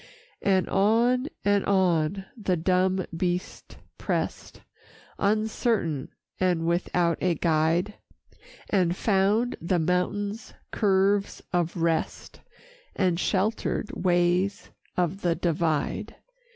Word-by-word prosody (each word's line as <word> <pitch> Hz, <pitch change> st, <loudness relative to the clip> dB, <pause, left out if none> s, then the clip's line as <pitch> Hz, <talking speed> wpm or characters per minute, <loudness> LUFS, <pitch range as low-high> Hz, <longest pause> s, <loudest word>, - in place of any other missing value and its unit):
VII -, -, 0 dB
And 190 Hz, -1 st, +3 dB
on 235 Hz, +6 st, +2 dB, 0.2 s
and 205 Hz, -1 st, +3 dB
on 190 Hz, -1 st, +1 dB
the 195 Hz, -6 st, -1 dB
dumb 185 Hz, +2 st, +1 dB
beast 180 Hz, +1 st, -3 dB, 0.2 s
pressed, -, -, -3 dB, 0.6 s
Uncertain, 210 Hz, -, 0 dB, 0.3 s
and 180 Hz, -3 st, +1 dB
without 170 Hz, 0 st, +1 dB
a 180 Hz, -2 st, +2 dB
guide, 165 Hz, +5 st, +1 dB, 0.8 s
And 180 Hz, -4 st, +2 dB
found 210 Hz, +5 st, +1 dB
the 175 Hz, +2 st, +1 dB
mountain's 200 Hz, +6 st, -1 dB, 0.2 s
curves 200 Hz, -1 st, +1 dB
of 175 Hz, 0 st, 0 dB
rest 165 Hz, -1 st, -2 dB, 0.5 s
And 180 Hz, -3 st, +1 dB
sheltered 210 Hz, +3 st, -1 dB
ways 180 Hz, +2 st, +1 dB, 0.3 s
of 180 Hz, +2 st, 0 dB
the 170 Hz, -2 st, +1 dB
Divide. 160 Hz, -3 st, -1 dB
185 Hz, 100 wpm, -26 LUFS, 170-200 Hz, 0.8 s, And